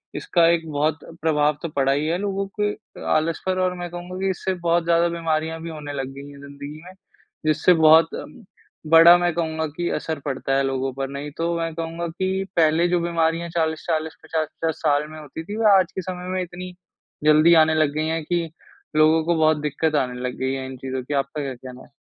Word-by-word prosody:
इसका 170 -2 +2
एक 165 -1 -1
बहुत 150 +2 0 0.2
प्रभाव 150 -2 +2
तो 170 - -4
पड़ा 135 -1 +2
ही 145 +3 0
है 165 +2 0
लोगों 195 0 -2
के 210 0 +2
अ, - - -16
आलस 160 +1 0
पर 185 0 0
और 185 0 +1
मैं 175 0 -5
कहूँगा 175 +1 -7
कि 195 0 0
इससे 190 0 -2
बहुत 170 0 +3
ज़्यादा 170 0 +3
बीमारियाँ 160 -1 -2
भी 165 - -6
होने 150 -2 -7
लग 135 -2 -3
गई 140 +1 -9
हैं 140 - -13
ज़िंदगी 140 +2 -9
में, 185 - -11 0.5
जिससे 155 +3 +4
बहुत 160 0 +6
अम, 245 - -9 0.5
बड़ा 165 +2 +9
मैं 175 -1 0
कहूँगा 160 -1 -2
कि 175 0 -1
असर 160 -2 -4
पड़ता 135 -1 -1
है 140 - +2
लोगों 135 0 -1
पर। 135 0 -4
नहीं 140 +1 -6
तो 170 +1 -1
मैं 165 -1 -2
कहूँगा 165 +1 -4
कि 190 +3 -2
पहले 165 +1 +4
जो 175 0 +2
बीमारियाँ 170 0 0
40-40 160 -1 -1
50-50 160 0 -2
साल 150 0 +2
में 155 - -9
होती 155 +2 -8
थी, 205 +6 -6
वे 225 - 0
आज 185 - -1
के 190 - -2
समय 180 0 -6
में 185 - -1
इतनी 180 +1 -8 0.5
जल्दी 155 +2 +6
आने 160 0 +1
लग 155 -2 +2
गई 155 +1 0
हैं 160 0 -1
कि 170 0 -1 0.5
लोगों 155 +1 +5
को 170 0 +2
बहुत 155 -1 +3
दिक्कत 150 +1 -1
आने 125 -3 -1
लग 125 0 -3
गई 130 0 -1
है 135 -1 -4
इन 130 0 -8
चीज़ों 130 0 -4
की। 145 +4 -5
आपका 140 +2 -2
क्या 135 -1 -4
कहना 125 +1 -11
है? - - -24
160 Hz, 220 wpm, -23 LUFS, 145-170 Hz, 0.5 s, बड़ा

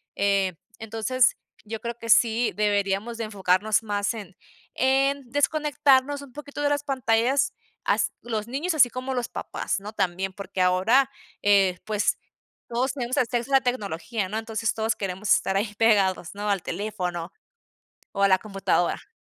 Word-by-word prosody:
eh, 195 -2 +2 0.3
entonces 225 +3 +1 0.3
yo 220 +1 -5
creo 235 +1 -5
que 230 -1 -8
sí 230 +1 +4
deberíamos 205 +2 0
de 230 - -3
enfocarnos 205 +1 +1
más 205 0 -1
en 200 -5 -9 0.4
en 270 0 +1
desconectarnos 285 -1 +2
un 265 -3 -13
poquito 290 0 -7
de 290 - +2
las 290 0 0
pantallas, 260 -1 +1 0.3
as - - +2
los 220 -2 -3
niños, 315 +7 -1
así 255 -5 +6
como 255 +2 -4
los 245 -2 -2
papás, - - -3
¿no?, 210 +2 -8
también 190 0 -1
porque 195 -1 -4
ahora, 220 +10 +4 0.3
eh, 195 -3 +4
pues 210 -1 +1 0.5
todos 245 +3 0
tenemos 255 -3 -3
acceso 240 +1 0
a 270 - +7
la - - +5
tecnología, 215 -4 -2
¿no?, 215 +3 -3
entonces 225 0 -2
todos 220 +1 0
queremos 195 +1 -4
estar 195 0 0
ahí 210 +1 -1
pegados, 200 -5 +2
¿no?, 210 +1 -3
al 195 -3 0
teléfono 180 -3 -4 0.8
o 200 -1 -2
a 200 - +6
la 190 -1 +5
computadora. 195 -3 -1
220 Hz, 160 wpm, -25 LUFS, 200-255 Hz, 0.8 s, a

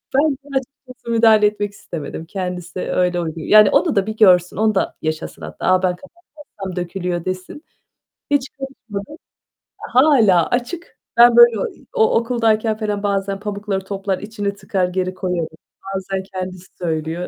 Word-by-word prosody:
Ben 295 +2 +4
de 275 0 -4
açıkçası 255 -2 -8
müdahale 225 -2 +5
etmek 205 -1 0
istemedim. 165 -3 -7
Kendisi 180 0 -5
öyle 180 -1 0
uygun 165 -1 -4
Yani, 210 +4 +6
onu - - +2
da 200 -1 +2
bir 220 - -4
görsün, 180 -5 +5
onu 215 -1 +2
da - - 0
yaşasın 155 - -4
hatta. 75 0 -7
"A, 185 0 +3
ben 180 -1 +1 0.4
kapatmazsam 195 -10 -8
dökülüyor!" 175 -1 -3
desin. 185 - -5 0.7
Hiç 275 -2 +1
karışmadım. 265 -2 -8 0.6
Hâlâ 235 - +4
açık, 260 +8 -3 0.2
ben 240 0 +7
böyle 235 -3 +7
o - - -1
i - - -21
o 450 -2 +3
okuldayken 225 -2 +1
felan 210 -2 -3
bazen 195 -1 -1
pamukları 200 -2 -3
toplar, 195 -1 -3
içini 205 -1 -4
tıkar, 190 -2 -1
geri 185 0 -2
koyarım. 180 -3 -2 0.5
Bazen 190 0 -3
kendisi 185 -1 -6
söylüyor. 165 0 -3
200 Hz, 155 wpm, -20 LUFS, 180-230 Hz, 0.7 s, ben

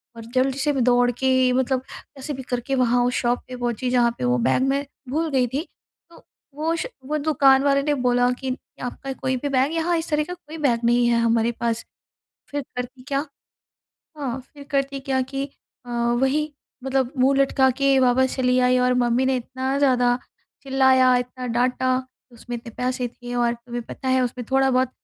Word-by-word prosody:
और 230 - -9
जल्दी 265 +1 +1
से 295 +1 +1
मैं 265 - +1
दौड़ 245 0 +4
के 260 +1 +2
मतलब 260 0 +1
कैसे 280 +1 -8
भी 265 -1 -6
करके 245 +3 -1
वहाँ 245 -1 +3
उस 245 - 0
शॉप 245 0 +1
पे 255 - -7
पहुँची 245 0 -2
जहाँ 240 -1 +3
पे - - -5
वो 125 0 +2
बैग 130 - +2
मैं 280 +1 0 0.2
भूल 320 +4 0
गई 255 -2 +2
थी। 280 +8 -3 0.4
तो 335 - -17 0.3
वो 320 +3 0
श 335 - -3 0.2
वो 305 +3 -1
दुकान 275 -3 +4
वाले 280 -1 +3
ने 295 +1 +1
बोला 245 0 +3
कि 260 -1 -2 0.3
आपका 270 +2 -5
कोई 260 0 -2
भी 285 +3 -3
बैग 275 +3 +1
यहाँ 335 +1 +1
इस 325 +1 -4
तरह 300 0 +1
का 355 - -6
कोई 325 -3 -11
बैग 265 -7 +1
नहीं 240 0 +3
है 235 -1 +3
हमारे 230 0 +2
पास। 230 -1 -1 0.7
फिर 290 0 -2
करती 250 +1 -6
क्या? 275 -1 0 1.0
हाँ 265 -2 -3
फिर 285 +1 -14
करती 275 0 -1
क्या 265 -1 0
कि 270 +1 -4 0.4
अ, 245 - -8
वही 265 +6 +1 0.3
मतलब 265 0 0
मुँह 270 +2 +4
लटका 270 -1 +3
के 275 +1 +2
वापस 260 +1 +3
चली 250 -1 +2
आई 250 0 +3
और 250 0 +2
मम्मी 245 +1 +2
ने 265 - +2
इतना 260 +2 -3
ज़्यादा 250 -3 +3 0.4
चिल्लाया, 265 -1 +4
इतना 250 +1 -4
डाँटा। 250 +2 +1 0.4
उसमें 240 +1 -7
इतने 230 0 -10
पैसे 250 0 -1
थे 245 +1 -9
और 240 -1 +1
तुम्हें 240 0 -7
पता 260 - -6
है 260 0 +3
उसमें 245 0 -3
थोड़ा 270 0 +3
बहुत 255 0 +2
255 Hz, 195 wpm, -23 LUFS, 245-275 Hz, 1.0 s, दौड़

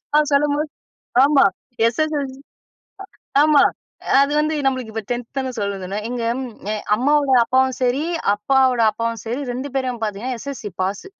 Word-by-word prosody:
நான் 300 -1 +4
சொல்லும்போது, 295 +1 +1 0.6
ஆமா, 285 -1 +5 0.4
எஸ்.எஸ்.எல்.சி! 280 0 -2 1.0
ஆமா, 300 -2 +5 0.6
அது 280 +1 +2
வந்து 310 +1 0
நம்மளுக்கு 255 -4 -1
இப்ப 225 - -3
10த் 240 -1 -3
தான 260 -1 -2
சொல்ல 200 -1 -2
சொன்னாங்க. 205 +4 -4
எங்க 245 -2 -3 0.7
அம்மாவோட 285 +2 +2
அப்பாவும் 260 +1 +2
சரி, 255 +4 +1 0.3
அப்பாவோட 255 +3 +2
அப்பாவும் 230 -1 -3
சரி 240 +5 -2
2 260 +3 -5
பேரையும் 255 -3 -2
பார்த்தீங்கன்னா, 220 +4 -3
எஸ்.எஸ்.எல்.சி! 245 -6 -7
பாஸு! 195 - -3
260 Hz, 135 wpm, -20 LUFS, 230-280 Hz, 1.0 s, ஆமா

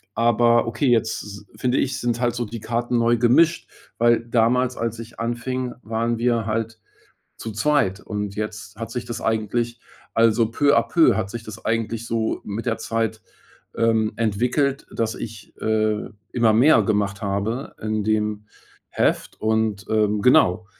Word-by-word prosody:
Aber 120 0 +3
okay, 115 +4 -1
jetzt 115 -2 +1
s 105 0 -10
finde 125 0 0
ich, 135 - -1
sind 120 -1 -1
halt 120 -1 +1
so 120 -1 -2
die 115 +2 -7
Karten 120 +2 -1
neu 115 0 +3
gemischt, 155 +9 +3 0.3
weil 120 0 +3
damals, 120 +2 +1
als 115 0 -3
ich 115 0 -10
anfing, 120 +2 -3
waren 115 +1 -1
wir 115 -2 +1
halt 115 0 -3 0.6
zu 115 - -6
zweit. 105 -4 +1
Und 105 -1 -5
jetzt 105 0 -5
hat 115 -1 -5
sich 120 -1 -4
das 120 - -5
eigentlich 115 +2 -1 0.3
also, 115 0 +3
peu 145 +4 +3
à - - +5
peu 165 -2 +4
hat 95 - -2
sich 115 0 -7
das 110 0 -10
eigentlich 115 0 -1
so 115 -1 -1
mit 105 +2 -5
der - - 0
Zeit, 115 -1 -2 0.5
ähm, 110 -1 +2
entwickelt, 125 +6 0
dass 115 -1 -1
ich, 110 -2 -9
äh, 110 -1 0 0.2
immer 115 -3 +3
mehr 130 +8 +5
gemacht 100 -2 -1
habe 100 +7 -3
in 110 -1 -1
dem 105 -1 -1 0.4
Heft - - -1
und, 110 -2 0
ähm, 105 -1 +1
genau. 105 -4 +4
115 Hz, 160 wpm, -22 LUFS, 110-120 Hz, 0.6 s, à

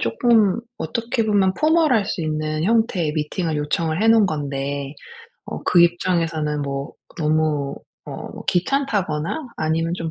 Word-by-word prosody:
쪼끔 215 - +3 0.2
어떻게 235 -1 -2
보면 200 -3 +3
formal할 310 -9 +3
수 170 - -3
있는 155 0 -2
형태의 200 -8 +1
미팅을 155 +1 -2
요청을 155 +4 -1
해 225 - +3
놓은 225 -3 +6
건데 140 -2 -3 0.5
어 - - -6
그 175 - +4
입장에서는 165 -4 0
뭐 140 0 -4 0.3
너무 150 -2 0 0.3
어 - - -6 0.2
뭐 - - -9
귀찮다거나 205 - 0
아니면 165 +2 0
좀 165 -1 -4
165 Hz, 310 characters per minute, -21 LUFS, 150-215 Hz, 0.5 s, 놓은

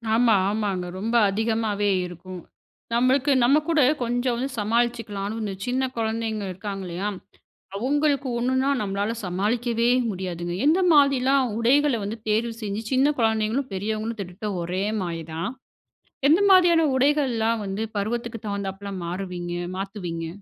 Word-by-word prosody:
ஆமா. 230 -2 +4
ஆமாங்க. 200 -4 -1
ரொம்ப 225 +4 -2
அதிகமாவே 215 0 0 0.2
இருக்கும். 180 +1 -9 0.5
நம்மளுக்கு 255 +4 +3
நம்ம 270 +5 +5
கூட, 320 -3 +4 0.2
கொஞ்சம் 245 +1 0
வந்து 260 +3 -2
சமாளிச்சிக்கலான்னு 225 -2 -1
இந்த 205 -2 -3
சின்ன 255 +2 0
குழந்தைங்க 220 -1 -2
இருக்காங்கல்லயா! 190 -1 -5 0.7
அவுங்களுக்கு 280 +4 +1
ஒன்னுனா 260 +2 +1
நம்மளால 200 +2 -1
சமாளிக்கவே 230 +6 0 0.2
முடியாதுங்க. 175 -3 -4
எந்த 320 +5 +4
மாதிரிலாம் 275 -3 +4
உடைகள 275 +3 +3
வந்து 210 +3 -4
தேர்வு 225 +2 +1
செஞ்சு, 210 0 -3
சின்ன 270 +3 +3
குழந்தைங்களும், 225 +4 +1
பெரியவங்களும் 215 +3 -3
கிட்டத்தட்ட, 200 +2 -5
ஒரே 180 +3 -2 0.2
மாரி 170 -2 -4
தான். 165 +6 -3 0.8
எந்த 325 +6 +5
மாதிரியான 345 -4 +6
உடைகள்லாம் 250 -5 +2
வந்து, 195 +2 -3
பருவத்துக்கு 230 +2 -3
தகுந்தாப்ல 200 0 -4
மாறுவீங்க? 175 -1 -4 0.2
மாத்துவீங்க? 185 -4 -4
220 Hz, 120 wpm, -24 LUFS, 195-250 Hz, 0.8 s, மாதிரியான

